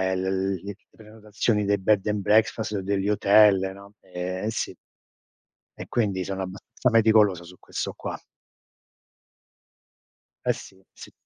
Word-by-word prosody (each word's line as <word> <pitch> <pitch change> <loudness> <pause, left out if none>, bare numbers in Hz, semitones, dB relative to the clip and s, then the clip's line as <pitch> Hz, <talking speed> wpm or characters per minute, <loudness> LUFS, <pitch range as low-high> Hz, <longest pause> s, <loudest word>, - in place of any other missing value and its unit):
l 95 0 -1
le 100 0 -6
prenotazioni 105 0 -3
dei 100 0 +2
bed 105 +1 +2
and 105 -1 0
breakfast, 110 +1 +2
o 100 - -2
degli 100 +1 -1
hotel, 105 -1 +5 0.2
no, 100 +1 -14
ehm, 90 +1 -5
e 110 - -1
sì - - -3 1.0
e - - -8
quindi, 100 -6 0
sono 95 +1 -4
abbastanza 95 +6 -3
meticoloso 110 -5 +4
su 90 +1 -14
questo - - -5
qua. - - -6 2.3
Eh - - +3
sì, 95 0 -13
sì. - - -12
100 Hz, 135 wpm, -25 LUFS, 95-105 Hz, 2.3 s, hotel